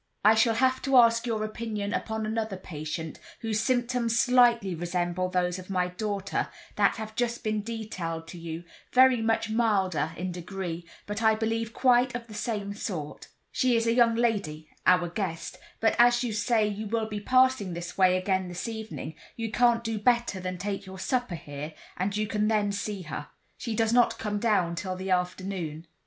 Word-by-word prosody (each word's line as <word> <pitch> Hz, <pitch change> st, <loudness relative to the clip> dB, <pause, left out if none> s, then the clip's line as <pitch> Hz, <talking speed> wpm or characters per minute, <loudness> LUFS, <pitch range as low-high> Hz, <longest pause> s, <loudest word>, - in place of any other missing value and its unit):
"I 215 Hz, -, +8 dB
shall 225 Hz, +1 st, +3 dB
have 260 Hz, +2 st, +2 dB
to 270 Hz, -1 st, +3 dB
ask 230 Hz, 0 st, +5 dB
your 220 Hz, -2 st, -1 dB
opinion 215 Hz, -2 st, -3 dB
upon 220 Hz, -1 st, -2 dB
another 220 Hz, -2 st, -2 dB
patient, 155 Hz, -2 st, -6 dB, 0.2 s
whose 220 Hz, -2 st, -1 dB
symptoms 245 Hz, -1 st, +1 dB
slightly 240 Hz, -6 st, +4 dB
resemble 175 Hz, +1 st, -1 dB
those 180 Hz, 0 st, 0 dB
of 185 Hz, -, -11 dB
my 180 Hz, -2 st, 0 dB
daughter, 200 Hz, +1 st, -2 dB, 0.3 s
that -, -, +3 dB
have 220 Hz, -1 st, -6 dB
just 235 Hz, 0 st, -1 dB
been 215 Hz, -1 st, 0 dB
detailed 185 Hz, -7 st, -5 dB
to 175 Hz, -, -8 dB
you—very 175 Hz, +10 st, +2 dB
much 225 Hz, 0 st, +1 dB
milder 190 Hz, -9 st, +1 dB
in 185 Hz, 0 st, -3 dB
degree, 175 Hz, -1 st, -5 dB, 0.2 s
but 210 Hz, +2 st, -4 dB
I 220 Hz, -1 st, +5 dB
believe 225 Hz, +1 st, -1 dB
quite 250 Hz, +1 st, +3 dB
of 240 Hz, -1 st, -4 dB
the 220 Hz, -, -12 dB
same 210 Hz, -2 st, -3 dB
sort. 170 Hz, -8 st, -5 dB, 0.2 s
She 255 Hz, -2 st, +2 dB
is 230 Hz, 0 st, +2 dB
a 230 Hz, -, +3 dB
young 235 Hz, -1 st, +4 dB
lady—our 180 Hz, -5 st, +1 dB
guest; 170 Hz, -3 st, -4 dB, 0.2 s
but 225 Hz, -, +3 dB
as 240 Hz, +1 st, +6 dB
you 235 Hz, -3 st, -2 dB
say 215 Hz, 0 st, +2 dB
you 210 Hz, +1 st, -4 dB
will 225 Hz, +1 st, 0 dB
be 210 Hz, -1 st, -4 dB
passing 255 Hz, -5 st, +3 dB
this 175 Hz, 0 st, -6 dB
way 185 Hz, -1 st, +4 dB
again 185 Hz, 0 st, 0 dB
this 180 Hz, +5 st, -5 dB
evening, 220 Hz, -7 st, -6 dB, 0.2 s
you 225 Hz, -1 st, -4 dB
can't 235 Hz, 0 st, +3 dB
do 225 Hz, -2 st, -2 dB
better 235 Hz, -3 st, +2 dB
than 185 Hz, 0 st, -4 dB
take 195 Hz, +1 st, -4 dB
your 190 Hz, 0 st, -8 dB
supper 245 Hz, -1 st, -1 dB
here, 150 Hz, 0 st, -7 dB, 0.2 s
and 195 Hz, +3 st, -1 dB
you 215 Hz, -, +1 dB
can 210 Hz, 0 st, 0 dB
then 210 Hz, -2 st, +2 dB
see 200 Hz, -1 st, -4 dB
her. 155 Hz, -, -6 dB, 0.3 s
She 230 Hz, -3 st, -4 dB
does 225 Hz, +1 st, +2 dB
not 245 Hz, -1 st, +4 dB
come 210 Hz, -1 st, -2 dB
down 205 Hz, -6 st, +2 dB
till 185 Hz, +2 st, -3 dB
the 190 Hz, +1 st, -4 dB
afternoon." 180 Hz, -3 st, -2 dB
210 Hz, 180 wpm, -28 LUFS, 180-230 Hz, 0.3 s, I